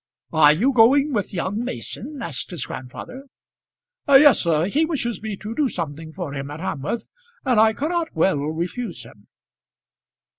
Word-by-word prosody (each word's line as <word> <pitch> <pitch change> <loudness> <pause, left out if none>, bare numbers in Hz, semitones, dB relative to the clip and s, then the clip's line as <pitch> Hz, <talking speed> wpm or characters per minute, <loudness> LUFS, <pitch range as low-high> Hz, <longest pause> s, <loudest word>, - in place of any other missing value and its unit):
"Are 155 -2 +7
you 230 - +2
going 270 +5 +5
with 205 -5 -1
young 195 +5 -2
Mason?" 265 +3 -6
asked 135 -6 -4
his 170 -8 -4
grandfather. 250 - -8 0.8
"Yes, 280 -2 +7
sir; 165 -2 +1
he 280 - +1
wishes 245 - -2
me 215 -2 -5
to 215 +3 -6
do 280 +2 +1
something 160 -3 -5
for 170 -4 -6
him 140 0 -5
at 150 +2 -7
Hamworth, 165 - -3 0.4
and 250 -5 +3
I 220 0 +5
cannot 325 +6 -2
well 160 -1 +2
refuse 170 - -4
him." 105 -3 -17
205 Hz, 155 wpm, -22 LUFS, 160-255 Hz, 0.8 s, Are